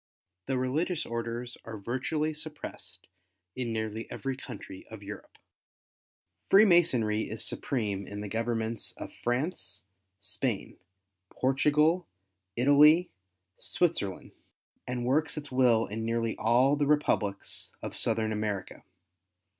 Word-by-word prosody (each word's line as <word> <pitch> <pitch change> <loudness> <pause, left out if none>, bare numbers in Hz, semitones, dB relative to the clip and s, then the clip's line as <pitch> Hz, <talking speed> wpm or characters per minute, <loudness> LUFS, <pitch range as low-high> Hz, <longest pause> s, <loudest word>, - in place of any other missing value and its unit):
The 135 - 0
religious 150 +7 0
orders 115 +1 -4
are 115 -1 -7
virtually 130 +9 -1
suppressed 150 - -7 0.5
in 125 -2 -2
nearly 110 0 -3
every 135 -1 -3
country 95 -7 -9
of 110 -2 -10
Europe. 100 0 -9 1.1
Freemasonry 170 - +5
is 110 +1 -2
supreme 105 -7 -2
in 105 0 -6
the 105 - -4
governments 115 +1 -2
of - - -8
France, 120 - -3 0.4
Spain, 105 +2 -3 0.5
Portugal, 150 +6 +2 0.5
Italy, 150 +7 +6 0.5
Switzerland, 155 - -1 0.6
and 125 -1 -2
works 150 +5 +1
its 145 -2 -5
will 125 -3 +4
in 110 +2 -4
nearly 115 0 0
all 125 +5 +4
the 145 -1 +1
republics 110 -9 0
of - - -5
Southern 110 -1 0
America. 105 -3 -3
120 Hz, 110 wpm, -29 LUFS, 110-145 Hz, 1.1 s, Italy